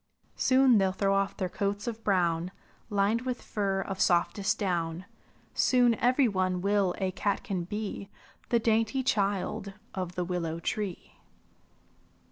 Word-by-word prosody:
"Soon 260 Hz, -3 st, +5 dB
they'll 190 Hz, -1 st, +2 dB
throw 195 Hz, +1 st, +1 dB
off 195 Hz, 0 st, 0 dB
their 185 Hz, -, -1 dB
coats 200 Hz, +2 st, -2 dB
of 230 Hz, -2 st, -5 dB
brown 175 Hz, -3 st, +1 dB, 0.4 s
Lined 205 Hz, +2 st, +1 dB
with 250 Hz, -1 st, -3 dB
fur 195 Hz, -2 st, -1 dB
of 190 Hz, -1 st, -4 dB
softest 180 Hz, +3 st, +2 dB
down; 175 Hz, -2 st, -2 dB, 0.5 s
Soon 245 Hz, -2 st, +4 dB
every 255 Hz, +2 st, +4 dB
one 185 Hz, -3 st, 0 dB
will 200 Hz, -2 st, +1 dB
a 190 Hz, -1 st, -1 dB
catkin 195 Hz, -1 st, -2 dB
be. 205 Hz, 0 st, -5 dB, 0.4 s
The 235 Hz, -, +4 dB
dainty 225 Hz, +3 st, +1 dB
child 200 Hz, -3 st, -1 dB, 0.2 s
of 180 Hz, -2 st, -4 dB
the 180 Hz, -, -1 dB
willow 170 Hz, -2 st, -2 dB
tree." 195 Hz, +1 st, -4 dB
195 Hz, 135 wpm, -29 LUFS, 185-220 Hz, 0.5 s, Soon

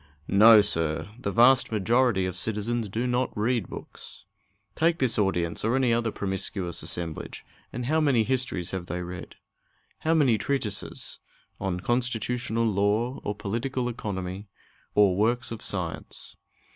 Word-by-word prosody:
No, 110 Hz, +2 st, +8 dB
sir! 80 Hz, -3 st, -1 dB
The 100 Hz, -, -2 dB
vast 120 Hz, +4 st, +5 dB
majority 115 Hz, -1 st, +2 dB
of 90 Hz, -1 st, -3 dB
citizens 110 Hz, +2 st, -2 dB
do 115 Hz, +5 st, -2 dB
not 125 Hz, -1 st, -1 dB
read 110 Hz, -2 st, 0 dB
books. -, -, -10 dB, 0.5 s
Take 165 Hz, +5 st, +2 dB
this 125 Hz, -5 st, +1 dB
audience, 90 Hz, -4 st, 0 dB
or 115 Hz, +4 st, +2 dB
any 130 Hz, -3 st, +3 dB
other 115 Hz, 0 st, +1 dB
promiscuous 95 Hz, -3 st, -2 dB
assemblage, 85 Hz, -1 st, -4 dB, 0.3 s
and 120 Hz, +1 st, -4 dB
how 155 Hz, +5 st, +2 dB
many 135 Hz, -7 st, +3 dB
histories 125 Hz, -8 st, -1 dB
have 95 Hz, -2 st, -4 dB
they 90 Hz, 0 st, -3 dB
read? 90 Hz, 0 st, -8 dB, 0.6 s
How 160 Hz, +1 st, +1 dB
many 130 Hz, -9 st, +3 dB
treatises 125 Hz, -8 st, -3 dB, 0.4 s
on 90 Hz, -2 st, -2 dB
constitutional 120 Hz, 0 st, 0 dB
law, 105 Hz, +4 st, +1 dB
or 105 Hz, -, -2 dB
political 120 Hz, +5 st, -2 dB
economy, 100 Hz, -4 st, -5 dB, 0.5 s
or 100 Hz, -3 st, +5 dB
works 115 Hz, +5 st, +1 dB
of 115 Hz, -, -6 dB
science? 90 Hz, -5 st, -4 dB
110 Hz, 140 wpm, -27 LUFS, 95-125 Hz, 0.6 s, No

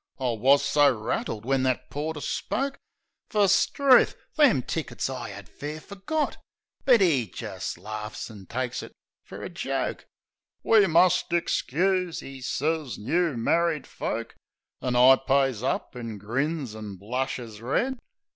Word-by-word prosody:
I 130 Hz, -2 st, 0 dB
wus 135 Hz, +5 st, +4 dB
so 145 Hz, 0 st, +5 dB
rattled 110 Hz, -1 st, -3 dB
when 135 Hz, 0 st, +2 dB
that 130 Hz, -1 st, -1 dB
porter 150 Hz, +1 st, -3 dB
spoke. 270 Hz, -, -2 dB, 0.5 s
Fer, 205 Hz, -2 st, +3 dB
'struth! 265 Hz, +7 st, +5 dB, 0.2 s
them 270 Hz, -, +5 dB
tickets 155 Hz, -3 st, -3 dB
I 125 Hz, -3 st, -5 dB
'ad 100 Hz, -2 st, -9 dB
fair 150 Hz, -, -7 dB
forgot! 205 Hz, -, -3 dB, 0.5 s
But 240 Hz, -6 st, +6 dB
'e 140 Hz, -, +2 dB
jist 90 Hz, -, -6 dB
laughs, 105 Hz, +4 st, -6 dB
an' 100 Hz, -4 st, -12 dB
takes 125 Hz, 0 st, -3 dB
it -, -, -10 dB, 0.3 s
fer -, -, -9 dB
a -, -, -5 dB
joke. -, -, -3 dB, 0.6 s
"We 215 Hz, -3 st, +5 dB
must 175 Hz, +1 st, +4 dB
ixcuse," 175 Hz, +1 st, 0 dB
'e 135 Hz, -1 st, -9 dB
sez, 150 Hz, +1 st, -1 dB
"new 160 Hz, +5 st, 0 dB
married 165 Hz, +4 st, +1 dB
folk." 115 Hz, +1 st, -4 dB, 0.5 s
An' 125 Hz, -1 st, -1 dB
I 130 Hz, +2 st, +8 dB
pays 135 Hz, -4 st, +1 dB
up. 130 Hz, -, -2 dB
an' 115 Hz, -3 st, -6 dB
grins, 130 Hz, +4 st, -2 dB
an' 105 Hz, -2 st, -7 dB
blushes 115 Hz, +1 st, -4 dB
red. 240 Hz, -, 0 dB
135 Hz, 140 wpm, -26 LUFS, 120-170 Hz, 0.6 s, I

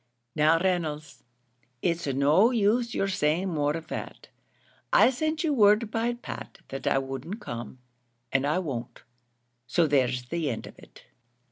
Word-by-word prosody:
"Now, 155 Hz, +2 st, +4 dB
Reynolds, 165 Hz, -4 st, -2 dB, 0.6 s
it's 170 Hz, -3 st, 0 dB
no 145 Hz, -, +4 dB
use 235 Hz, +1 st, +1 dB
you're 195 Hz, -, +1 dB
saying 180 Hz, 0 st, 0 dB
more 150 Hz, -2 st, 0 dB
of 165 Hz, -, -9 dB
that. -, -, -7 dB, 0.6 s
I -, -, +6 dB
sent 310 Hz, +5 st, -1 dB
you 310 Hz, -3 st, +1 dB
word 210 Hz, -2 st, +4 dB
by 230 Hz, +2 st, 0 dB
Pat 240 Hz, -, -8 dB
that 135 Hz, -, -5 dB
I -, -, +3 dB
wouldn't 135 Hz, -, -4 dB
come, 120 Hz, -, -7 dB, 0.6 s
and 135 Hz, +1 st, +2 dB
I 150 Hz, -, +1 dB
won't 135 Hz, -10 st, -5 dB, 0.6 s
so 165 Hz, +7 st, +3 dB
there's 130 Hz, -4 st, +1 dB
an 170 Hz, 0 st, -1 dB
end 120 Hz, -6 st, -3 dB
of -, -, -13 dB
it." -, -, -17 dB
165 Hz, 150 wpm, -27 LUFS, 140-210 Hz, 0.6 s, I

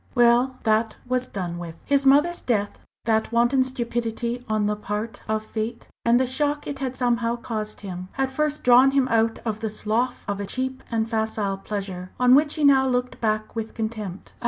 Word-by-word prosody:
Well, 245 Hz, +2 st, +4 dB
that 220 Hz, 0 st, +1 dB
was 255 Hz, 0 st, 0 dB
done 175 Hz, -5 st, -4 dB
with! 170 Hz, -2 st, -7 dB
His 280 Hz, -1 st, +2 dB
mother's 295 Hz, +6 st, +4 dB
death 205 Hz, -4 st, -1 dB, 0.3 s
that 220 Hz, 0 st, +1 dB
wanton 240 Hz, +3 st, +3 dB
stupidity 240 Hz, -1 st, -3 dB
on 215 Hz, -1 st, +1 dB
the 210 Hz, 0 st, +1 dB
part 210 Hz, +1 st, -4 dB
of 215 Hz, 0 st, -1 dB
fate 225 Hz, +2 st, -4 dB
and 235 Hz, +1 st, +4 dB
the 260 Hz, -, +2 dB
shock 290 Hz, +3 st, -1 dB
it 280 Hz, -2 st, -5 dB
had 260 Hz, -2 st, -3 dB
somehow 235 Hz, -2 st, +1 dB
caused 215 Hz, -3 st, -5 dB
him, 185 Hz, -2 st, -6 dB
had 270 Hz, -1 st, -1 dB
first 300 Hz, +2 st, -1 dB
drawn 250 Hz, +2 st, +7 dB
him 270 Hz, -1 st, +2 dB
out 225 Hz, 0 st, +2 dB
of 215 Hz, -2 st, -2 dB
the 220 Hz, -, -2 dB
slough 220 Hz, +4 st, -1 dB
of 200 Hz, 0 st, -2 dB
a 200 Hz, -, -4 dB
cheap 260 Hz, +4 st, -3 dB
and 225 Hz, -1 st, 0 dB
facile 220 Hz, -3 st, -1 dB
pleasure 195 Hz, -3 st, -5 dB
on 250 Hz, 0 st, +6 dB
which 290 Hz, +2 st, +4 dB
he 310 Hz, -, -2 dB
now 270 Hz, -2 st, +6 dB
looked 250 Hz, 0 st, -1 dB
back 215 Hz, -1 st, -1 dB
with 225 Hz, -1 st, -4 dB
contempt. 215 Hz, -4 st, -5 dB
235 Hz, 190 wpm, -24 LUFS, 215-255 Hz, 0.3 s, drawn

